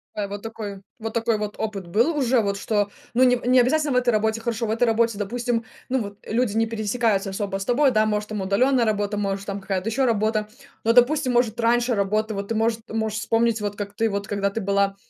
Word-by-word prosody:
А 205 -1 -2
вот 205 0 -6
такой, 210 -3 -7 0.2
вот 225 0 -5
такой 230 -1 +1
вот 210 0 -4
опыт 200 -5 -4
был 240 - +2
уже, 255 -2 +3
вот 200 -1 -1
что, 205 -1 0 0.2
ну, 255 +2 +4
не 250 -1 +4
не 250 +1 +5
обязательно 290 +3 +2
в - - -1
этой 250 -1 +2
работе, 220 0 +1
хорошо. 230 0 -2
В 215 - -2
этой 230 +2 +2
работе, 230 -1 +1
допустим, 235 +2 -2 0.2
ну 260 -1 +1
вот, 200 -1 -7
люди 225 -1 0
не 225 - +3
пересекаются 215 -2 0
особо 195 0 -3
с 195 - -5
тобой, 265 +2 +3
да, 215 -1 +3
может, 210 0 -1
там 210 -2 -3
удалённая 240 +6 +2
работа, 205 -1 -1
может, 195 -1 -2
там 200 0 -4
какая-то 190 +1 -2
ещё 260 +4 +1
работа, 215 -2 +1 0.4
но, 230 +1 +3
допустим, 255 +2 +4
может, 240 -2 +1
раньше 240 +1 +2
работа, 215 +2 0
вот 200 0 -4
ты, 225 - -1
может, 225 +1 +1
можешь 220 -1 -2
вспомнить, 225 0 +1
вот 205 -1 -3
как 200 -1 -5
ты, 225 -1 +1
вот 200 0 -3
когда 200 -1 0
ты 225 +3 -4
была 200 0 +1
220 Hz, 230 wpm, -23 LUFS, 205-235 Hz, 0.4 s, не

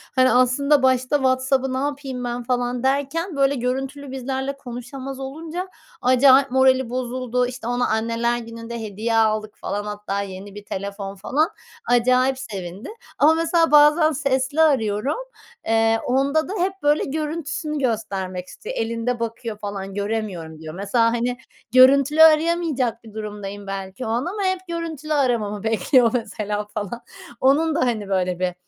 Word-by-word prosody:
hani 255 -2 +5
aslında 260 +3 +3
başta 255 +1 +2
WhatsApp'ı 260 -1 +1
ne - - -1
yapayım 275 -2 -3
ben 240 0 -3
falan 245 0 -1
derken 285 +6 -1
böyle 275 0 +2
görüntülü 270 +3 -3
bizlerle 265 +1 -3
konuşamaz 260 +1 -7
olunca 320 +7 -5 0.3
acayip 260 +1 +5
morali 260 -1 +3
bozuldu. 250 0 -1
İşte 250 -2 -7
ona 245 0 0
Anneler 230 +2 0
Günü'nde 230 0 -7
hediye 220 +2 -2
aldık 215 -1 +1
falan. 205 +1 -3
Hatta 205 -1 -3
yeni 195 +1 -8
1 205 - -10
telefon 200 0 -5
falan. 285 - 0 0.4
Acayip 255 +2 +3
sevindi. 195 -6 -7 0.3
Ama 305 +2 +5
mesela 330 0 +2
bazen 300 +2 +6
sesli 275 +1 0
arıyorum. 255 - +2 0.5
Eee, 225 0 +3
onda 275 +5 +1
da 390 - -4
hep 375 +2 +1
böyle 295 +1 +3
görüntüsünü 305 +1 -3
göstermek 190 -7 -2
istiyor. - - -8
Elinde 230 +2 -2
bakıyor 230 -1 -4
falan, 200 -2 -6
göremiyorum 200 -7 -4
diyor. 155 -1 -8
Mesela 200 +5 +1
hani 240 +1 -1 0.4
görüntülü 275 +4 +6
arayamayacak 310 -7 +3
bir 220 - -13
durumdayım 205 -2 -7
belki 195 +4 -5
o - - -3
an. 240 +5 0
Ama 400 +3 -3
hep 375 -1 +1
görüntülü 320 -3 -4
aramamı 230 -8 0
bekliyor 225 +2 +3
mesela 210 -3 -2
falan. 215 +3 -4 0.4
Onun 295 +4 +3
da 335 - +1
hani 215 -5 -1
böyle 185 -2 0
bir 180 -1 0
250 Hz, 145 wpm, -22 LUFS, 215-280 Hz, 0.5 s, bazen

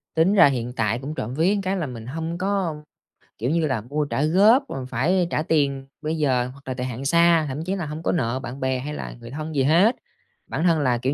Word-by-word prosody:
Tính 165 +5 +4
ra 200 - +7
hiện 125 -3 -2
tại 115 0 0
cũng 145 +4 -6
trộm 120 -1 -4
vía 175 +8 +2
cái 190 +1 -1
là 160 -5 -2
mình 115 -3 -8
hông 165 +5 -4
có, 190 -4 -1 0.6
kiểu 120 +4 -2
như 165 0 +1
là, 130 -6 -1
mua 145 +6 -2
trả 140 - -1
góp, 205 - +5
rồi 130 -1 -5
phải 165 +9 +1
trả - - +1
tiền 140 -4 0
bây 155 +1 -2
giờ 130 -5 +1
hoặc 140 0 -18
là 130 - -2
thời 125 0 -4
hạn 130 +2 -5
xa, 170 +1 +4
thậm 140 +3 -4
chí 185 +3 -2
là 180 -4 -3
hông 155 +2 -6
có - - +1
nợ 130 -6 0
bạn 130 +1 -7
bè 130 -1 0
hay 150 +4 -5
là - - -6
người 115 +1 -10
thân 155 +1 -5
gì 135 - +2
hết. 175 - +4 0.5
Bản 160 - -3
thân 165 -3 +3
là, 125 -4 +2
kiểu 130 +4 -1
150 Hz, 255 wpm, -23 LUFS, 130-165 Hz, 0.6 s, ra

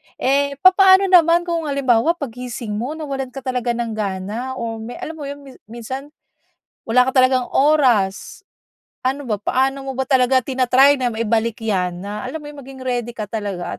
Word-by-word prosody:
Eh, 280 +2 0
papaano 380 0 +6
naman 340 -1 +5
kung 335 -3 -3
halimbawa 275 +3 +2
paggising 245 -5 -6
mo 245 +9 -3
nawalan 275 -4 -4
ka 270 - -7
talaga 250 -2 -2
ng 235 -1 -3
gana? 215 +5 -4
O 225 -2 -5
me 225 +2 -8
alam 320 - -6
mo 300 -3 -8
'yon 285 0 -8
mi 270 - -12 0.2
minsan, 250 +5 -7 0.8
wala 250 +3 +3
ka 260 - -2
talagang 255 -1 +3
oras. 260 - +2 0.6
Ano 270 +2 -2
ba, 210 -4 -3
paano 270 +5 0
mo 265 - -5
ba 265 - -1
talaga 260 -2 +2
tina-try 265 +2 +3
na 250 - +1
maibalik 230 0 -1
yan? 180 -3 -2
Na 205 +1 -5
alam 290 - -5
mo 295 - -8
yung 285 - -11
maging 265 0 -11
ready 240 -2 -3
ka 215 - -3
talaga 200 -4 -5
255 Hz, 180 wpm, -20 LUFS, 225-280 Hz, 0.8 s, papaano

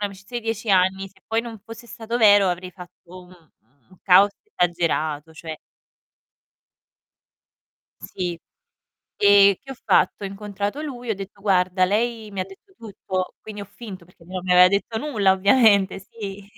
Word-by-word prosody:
un'amicizia 200 +3 -5
di 235 - -11
10 225 0 -3
anni 190 0 +2
se 190 0 -27
poi 225 +1 0
non 230 -2 -9
fosse 230 +1 -11
stato 230 0 -5
vero 205 -3 +6
avrei 180 +1 -4
fatto 180 0 -14
un 180 -3 -20 0.4
un 185 - -20
caos 195 +2 +6 0.2
esagerato, 165 -3 -1
cioè. 160 0 -8 2.5
Sì. 175 -2 -5 0.8
E 200 -1 +5
che 270 - -12
ho - - -6
fatto? - - +2
Ho - - -2
incontrato 205 +6 -5
lui 245 -5 -7
e - - +2
ho - - -3
detto: 195 +1 -10
"Guarda, 185 -2 +2
lei 220 +2 -1
mi 195 - -4
ha - - -1
detto 195 - -18
tutto," 190 -4 -5
quindi 210 -1 -9
ho - - -6
finto 200 -3 -11
perché 170 -1 -22
non 185 +1 -6
mi 185 - -5
aveva 180 0 +8
detto 200 +4 -1
nulla 220 -9 +1
ovviamente, 200 -1 +3
sì. 200 -1 -9
195 Hz, 165 wpm, -22 LUFS, 185-220 Hz, 2.5 s, aveva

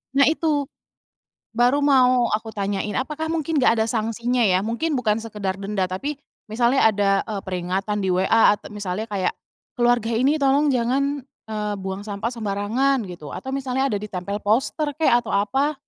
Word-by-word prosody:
Nah 280 - +5
itu, 305 -3 +1 0.9
baru 245 +4 +3
mau 255 -4 +4
aku 220 +1 -2
tanyain 200 0 -2
apakah 305 +4 -3
mungkin 325 -1 -1
gak 230 -2 +4
ada 220 - +2
sangsinya 235 +2 -1
ya? 185 -4 +4
Mungkin 235 +9 -1
bukan 220 -2 0
sekedar 205 -4 -3
denda 195 -1 -1
tapi 270 +11 -4 0.3
misalnya 240 +4 +2
ada, 200 -1 +1 0.2
eee, 210 -3 -4
peringatan 190 +3 -2
di 190 - 0
WA 190 +4 +4
at - - -13
misalnya 205 +1 -4
kayak, 200 -4 -1 0.4
"Keluarga 240 -1 +2
ini 260 +6 +2
tolong 280 +1 +3
jangan, 270 +3 0 0.2
eee, 210 -1 -3
buang 190 +1 -5
sampah 205 +2 -3
sembarangan," 230 +3 0
gitu 170 -5 -9
atau 265 - -6
misalnya 265 0 -1
ada 210 -7 -1
ditempel 200 0 -5
poster 265 +8 +1
kek 320 - +3
atau 230 - -7
apa? 265 +10 +1
225 Hz, 165 wpm, -23 LUFS, 205-270 Hz, 0.9 s, Nah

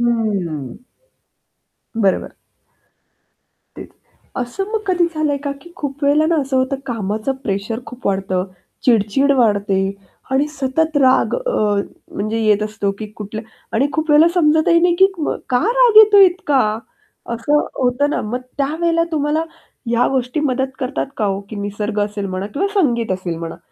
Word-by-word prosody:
हं. 200 - -1 1.3
बरोबर. 195 -2 +2 1.5
तेच, - - -9 0.5
असं 255 +10 -3
मग 445 - 0
कधी 360 -2 +2
झालंय 305 -2 0
का? 285 - -1
की 345 - -15
खूप 285 0 -4
वेळेला 295 +2 +4
ना 335 0 +2
असं 270 -1 -2
होतं, 260 +1 +1
कामाच 215 -1 -3
प्रेशर 205 +3 -3
खूप 250 0 -9
वाढतं, 190 -2 0 0.4
चिड-चिड 240 +4 +3
वाढते 205 -5 +2 0.5
आणि 270 +2 +2
सतत 300 +2 -1
राग 260 -2 +3
अ, - - -2 0.6
म्हणजे 215 +3 -2
येत 210 -1 +3
असतो 210 -1 -2
की 215 - -5
कुठल्या 215 +1 -6 0.3
आणि 265 +5 +3
खूप 315 0 -1
वेळेला 305 +3 +6
समजतही 335 0 +4
नाही 350 0 +3
की 385 - +8 0.4
का 245 - +2
राग 485 -2 +4
येतो 425 -1 +8
इतका? 350 -7 +1 0.7
असं 290 +6 +1 0.2
होतं 255 +4 +1
ना - - -1
मग. 240 +4 -3 0.2
त्यावेळेला 330 +4 +1
तुम्हाला 305 +1 0 0.5
या 235 +1 +3
गोष्टी 260 +2 -1
मदत 265 -2 0
करतात 265 0 -2
का 215 - -1
हो 195 -1 -1
की 215 - -6
निसर्ग 205 +1 -3
असेल 205 -1 -2
म्हणा 185 +1 -4
किंवा 285 - -2
संगीत 240 - +1
असेल 180 -3 -3
म्हणा 165 -1 -6
255 Hz, 150 wpm, -18 LUFS, 210-305 Hz, 1.5 s, की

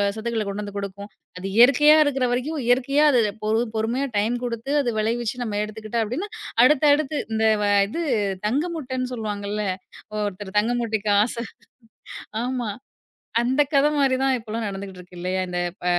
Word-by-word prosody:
சத்துக்கள 225 0 -2
கொண்டு 200 +1 -3
வந்து 205 -1 -7
கொடுக்கும். 200 +1 -6 0.3
அது 185 - -5
இயற்கையா 280 +5 +7
இருக்குற 270 -3 0
வரைக்கும் 285 +5 -1
இயற்கையா 265 +4 +3
அது 250 - +4 0.2
பொறு 220 +2 +2
பொறுமையா 230 +5 0
டைம் 220 +4 +1
கொடுத்து 235 +3 -3
அது 245 - -1
விளைவிச்சு 230 +2 -1
நம்ம 210 -3 -3
எடுத்துக்கிட்டா 215 +2 -3
அப்பிடின்னா, 295 - -4 0.3
அடுத்தடுத்து. 295 +1 +4 0.2
இந்த 220 0 +1 0.2
வ 205 - +1 0.2
இது 335 +11 -4 0.4
தங்கமுட்டன்னு 260 -1 -2
சொல்லுவாங்கல்ல. 210 -2 -3 0.6
ஒருத்தர் 200 0 -6
தங்க 230 +3 0
முட்டைக்கு 220 -2 -1
ஆசை, 235 0 -3 1.0
ஆமா. 250 -3 -2 0.7
அந்தக் 265 +5 +1
கதை 280 +1 +5
மாதிரி 265 -2 +3
தான் 265 -1 +3
இப்பபலாம் 225 -1 -4
நடந்துட்டு 195 -1 -7
இருக்கு 180 0 -15
இல்லயா! 185 +1 -1
இந்தப் 175 0 -2
ப - - -6
230 Hz, 150 wpm, -23 LUFS, 210-265 Hz, 1.0 s, இயற்கையா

